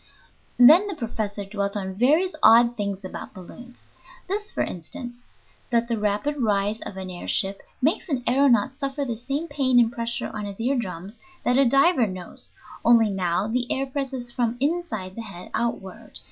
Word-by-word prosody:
Then 310 +11 +8
the 395 - -4
professor 215 -5 -4
dwelt 200 0 -2
upon 190 -2 -3
various 300 - +2
odd 235 +1 +6
things 200 -3 -3
about 185 - -8
balloons 240 +7 -12 0.4
this, 415 +2 -3
for - - -1
instance, 240 +8 -7 0.4
that 235 -1 +1
the 230 -2 -1
rapid 210 +8 -1
rise 210 -1 +1
of 190 - -7
an 190 -1 -6
air 175 - -8
ship 195 0 0 0.2
makes 320 +5 +1
an 270 -5 0
aëronaut 260 -1 +3
suffer 275 +1 -3
the 240 -3 -3
same 275 +8 -3
pain 260 -5 +2
and 230 -1 +4
pressure 235 0 -3
on 210 -1 -4
his 200 0 -8
ear 255 +5 +1
drums 195 -2 -5 0.3
that 250 +2 +3
a 275 - +5
diver 275 0 +4
knows, 185 -2 -7 0.3
only 230 -3 +5
now 185 0 0
the 245 +2 -1
air 270 - 0
presses 265 -3 -4
from 240 -1 -1
inside 275 - -2
the 230 - -6
head 195 -5 -10
outward. 220 -2 -4
235 Hz, 175 wpm, -24 LUFS, 200-270 Hz, 0.4 s, Then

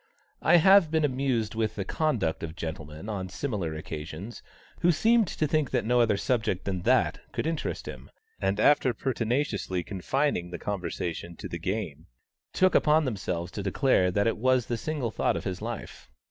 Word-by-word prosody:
I - - +5
have 190 0 +6
been 160 -1 +2
amused 130 -5 0
with 110 -1 -1
the 100 - -3
conduct 115 - 0
of 80 -1 -5
gentlemen 80 0 -6
on 95 -4 -4
similar 95 - -3
occasions, 80 +7 -7 0.4
who 175 - +4
seemed 225 +5 +3
to 155 - -1
think 155 -2 +1
that 125 -4 0
no 120 +1 +3
other 110 -4 +3
subject 110 -5 -1
than 95 -2 -2
that - - +2
could - - -3
interest 160 -1 -3
him, 65 +1 -8 0.3
and 95 +1 0
after 130 -1 +4
pertinaciously 115 -7 -1
confining 100 - -1
the 90 - -5
conversation 90 -3 -4
to - - -7
the 85 - -5
game, 85 -4 -4 0.4
took 185 0 +3
upon 155 0 +4
themselves 90 -7 -3
to 100 - -5
declare 100 -1 +2
that 100 +3 +1
it 115 - +1
was 130 +1 +2
the 120 - -2
single 135 -2 -3
thought - - 0
of - - -5
his 95 -1 -4
life. 115 0 -7
110 Hz, 175 wpm, -28 LUFS, 90-135 Hz, 0.4 s, have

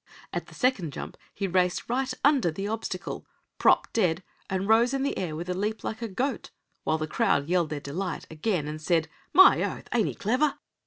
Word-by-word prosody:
At - - -3
the - - -14
second 215 - +1
jump - - -6 0.2
he 200 - -3
raced 180 -1 +1
right 255 +2 0
under 275 - +4
the 195 +5 -4
obstacle, 210 -4 -4 0.3
propped - - +4
dead, 180 -5 +1 0.3
and 190 +1 -1
rose 235 +4 +4
in 270 - 0
the 280 - 0
air 170 -5 -3
with 170 +3 -5
a 180 - -1
leap 210 +4 -2
like 220 - -4
a 230 - -2
goat, 250 +7 -2 0.3
while 155 - +1
the 155 - -2
crowd 155 -4 +1
yelled 175 -2 +2
their 150 -1 -3
delight 165 +6 -4
again, 160 -1 -1
and 155 +1 -5
said: 160 -1 +2 0.2
"My 380 +1 +8
oath! - - -3
ain't 230 -4 +3
he - - -4
clever?" 255 +8 +1
190 Hz, 205 wpm, -27 LUFS, 165-230 Hz, 0.3 s, My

